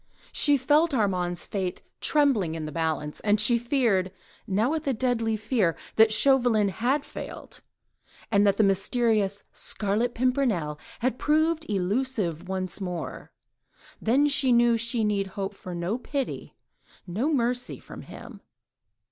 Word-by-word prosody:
She 290 -1 +4
felt 295 +4 +3
Armand's 180 -6 -1
fate 190 -3 -4 0.2
trembling 255 - +2
in 160 -1 -4
the 155 - -5
balance... 155 -1 -2 0.2
she 235 +3 +3
feared—now 220 -2 -1
with 315 -2 -3
a 270 - +1
deadly 225 -2 0
fear—that 220 0 +1
Chauvelin 240 -4 +3
had 255 +9 0
failed, - - -9 0.7
and 205 -1 +4
that 200 - +2
the 220 - +4
mysterious 205 0 +1
Scarlet 215 +4 -1
Pimpernel 230 - 0 0.2
had 250 +1 0
proved 315 +1 +1
elusive 195 -3 -1
once 185 0 -3
more; 180 -3 -5 0.7
then 270 +6 +3
she 275 -2 +2
knew 240 0 +5
that 230 - +2
she 230 0 0
need 205 -2 0
hope 195 +1 -5
for 180 -2 -8
no 175 +8 -2
pity, 275 +1 -4 0.5
no 215 - -1
mercy, 245 -2 0
from - - -11
him. 230 -4 -11
220 Hz, 130 wpm, -26 LUFS, 190-255 Hz, 0.7 s, knew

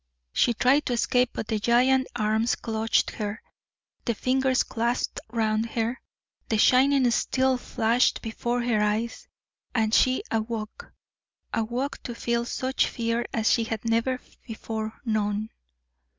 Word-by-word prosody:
She 240 - +3
tried 270 +6 +3
to 245 - 0
escape, 250 +1 +2
but - - -4
the 215 -1 -1
giant 255 +4 +3
arms 220 +1 +1
clutched 225 -1 0
her, 210 0 -4 0.7
the 235 - 0
fingers 260 +2 +2
clasped 235 +1 -1
round 220 -1 0
her, 230 +2 -2 0.5
the 220 - +2
shining 260 +2 +4
steel 260 +2 +1
flashed 235 0 +1
before 240 +1 -2
her 230 -3 +1
eyes, 215 +3 -1 0.5
and 220 -2 +1
she 255 +1 +3
awoke 225 - -4 0.6
awoke 240 +5 -2
to 240 - -6
feel 235 0 -1
such 260 +2 0
fear 230 0 -2
as 220 -1 +1
she 230 - +2
had 225 0 -4
never 230 +3 +1 0.3
before 220 -1 -5
known. 215 -1 -1
235 Hz, 135 wpm, -26 LUFS, 220-250 Hz, 0.7 s, shining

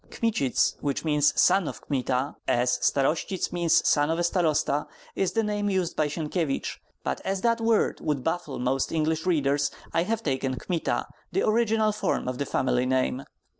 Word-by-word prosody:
Kmitsits, 210 - 0
which 140 +2 -2
means 150 -2 +3
"son 185 -2 +4
of - - -6
Kmita," 130 0 -1
as 125 +1 +2
"starostsits" 155 +6 0
means 170 -2 +3
"son 145 0 +3
of 165 - 0
a 175 - 0
starosta," 160 -4 +1 0.3
is 195 - 0
the 225 - +1
name 205 -1 -1
used 185 -3 -1
by 155 - +1
Sienkiewicz; 155 -1 -2 0.2
but 65 - -2
as 195 0 -2
that 230 -1 +2
word 225 -1 +2
would 145 -4 -1
baffle 165 -4 -2
most 130 +2 0
English 160 +1 0
readers, 145 -4 +2 0.2
I 165 - +3
have 225 +5 -1
taken 130 -4 -1
Kmita, 170 +2 -1 0.3
the 390 - +1
original 220 -1 +2
form 210 -10 -1
of 125 0 -3
the 140 - -2
family 125 -1 +1
name. 130 +1 0
160 Hz, 170 wpm, -26 LUFS, 135-190 Hz, 0.3 s, son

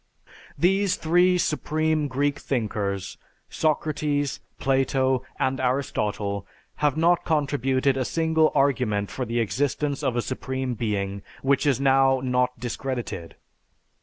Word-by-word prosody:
These 190 +5 +2
three 175 +3 +3
supreme 155 -2 0
Greek 140 +2 0
thinkers, 105 -6 -2 0.3
Socrates, 150 -2 0 0.2
Plato, 130 -1 +1 0.2
and 130 0 0
Aristotle, 105 -6 -1 0.3
have 150 -1 +1
not 170 +2 +3
contributed 140 -3 +1
a 130 - +1
single 160 +2 +2
argument 120 -8 +1
for 130 +7 -3
the 120 +1 -1
existence 140 +5 -1
of 135 -4 0
a 120 - 0
supreme 130 0 -3
being 100 -3 -2 0.2
which 140 +2 +2
is 135 -3 +3
now 135 -1 +4
not 125 -1 0
discredited. 120 -7 -4
135 Hz, 115 wpm, -25 LUFS, 125-150 Hz, 0.3 s, now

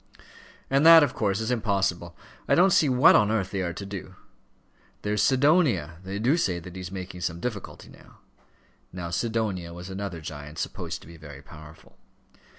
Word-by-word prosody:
"And 135 +2 +2
that, 165 -1 +9
of 140 - 0
course, 100 -2 -1
is 110 +2 -2
impossible. 100 -7 -1 0.3
I - - +3
don't 185 +2 +5
see 150 - +4
what 130 +4 +6
on 105 -2 +4
earth 110 -4 -1
they 95 - -2
are 85 -2 -2
to 100 - -7
do. 95 -4 -8 0.9
There's 105 0 0
Sidonia; 130 - +2
they 95 +1 -5
do 125 +10 +2
say 95 - 0
that 85 +1 -10
he's 90 -1 -7
making 90 -1 -7
some 85 0 -3
difficulty 105 -1 -6
now." - - -18 0.7
Now 85 -2 -6
Sidonia 100 -3 -2
was 90 +2 -9
another 95 -3 -5
giant, 75 0 -9
supposed - - -5
to - - -15
be 85 0 -13
very 75 -3 -12
powerful. 75 0 -15
95 Hz, 175 wpm, -26 LUFS, 85-115 Hz, 0.9 s, that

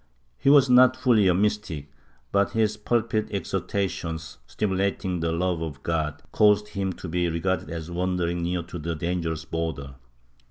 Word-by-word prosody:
He - - +3
was 140 -2 +7
not 125 0 +6
fully 110 -6 +4
a 90 - +5
mystic, 95 -8 -1 0.4
but 100 0 +2
his 110 -1 +1
pulpit 110 0 0
exhortations, 90 - -3
stimulating 95 - -1
the 80 0 0
love 85 0 0
of 80 -4 -6
God, 80 -3 -2
caused 105 0 +4
him 100 -2 -2
to 90 - -8
be 90 +1 0
regarded 85 +1 -1
as 85 +1 -6
wandering 90 -1 -1
near 85 0 -1
to 85 +1 -8
the 85 +2 -3
dangerous 80 -1 -2
border. 80 -5 -4
90 Hz, 155 wpm, -25 LUFS, 80-105 Hz, 0.4 s, was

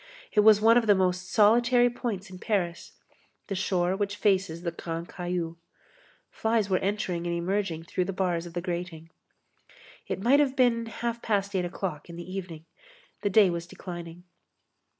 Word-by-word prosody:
It - - +2
was 210 0 +7
one 225 +2 +6
of 225 - -4
the 205 - +6
most 185 0 0
solitary 240 +3 +5
points 220 -6 -4
in 185 - -10
Paris; 180 -6 -2 0.6
the - - -1
shore 185 -1 0
which 200 0 -2
faces 190 -5 +1
the 170 - -1
Grand 165 0 -5
Caillou. 175 -2 -3 0.7
Flies 220 -3 0
were 185 - +3
entering 185 -4 -2
and 170 - -1
emerging 175 -1 -1
through 180 +2 -2
the 195 - -3
bars 180 -3 -1
of 170 - -12
the 175 - -1
grating. 170 -2 -5 1.0
It - - -3
might 250 +8 +4
have 275 -2 +2
been 235 -3 +2
half 235 +1 -4
past 200 -2 -1
eight 180 -1 +1
o'clock 175 -3 -5
in 170 - -8
the 175 - -7
evening. 180 -4 -7 0.6
The 205 - +1
day 200 -2 +5
was 170 0 -4
declining. 175 -1 -8
190 Hz, 170 wpm, -27 LUFS, 175-210 Hz, 1.0 s, was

